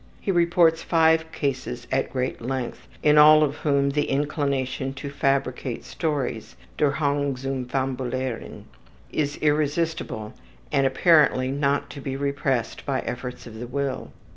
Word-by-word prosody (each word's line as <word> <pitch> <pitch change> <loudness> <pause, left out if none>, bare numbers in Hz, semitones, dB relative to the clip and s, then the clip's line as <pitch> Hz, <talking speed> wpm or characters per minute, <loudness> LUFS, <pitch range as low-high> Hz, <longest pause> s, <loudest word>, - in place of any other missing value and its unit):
He 195 - -1
reports 170 -2 +3
five 160 -1 +3
cases 130 -3 -3
at 135 0 0
great 130 -1 -2
length, 130 0 -4 0.2
in 150 0 +6
all 155 +1 +8
of 145 0 -1
whom 140 -2 +1
the 145 +1 0
inclination 135 -2 -1
to 140 +1 -6
fabricate 135 -3 -1
stories, 140 -8 -3 0.2
``der 145 -2 +2
Hang 140 -2 0
zum 135 0 -3
fabulieren,'' 130 -2 -3 0.5
is 145 -1 -1
irresistible 150 -6 0 0.4
and 135 -1 +3
apparently 135 -3 +4
not 140 0 0
to 140 - -8
be 135 -1 -4
repressed 135 -3 -1
by 135 -2 -1
efforts 125 +1 -6
of 110 -2 -10
the 120 - -5
will. 135 0 -3
140 Hz, 140 wpm, -24 LUFS, 130-150 Hz, 0.5 s, all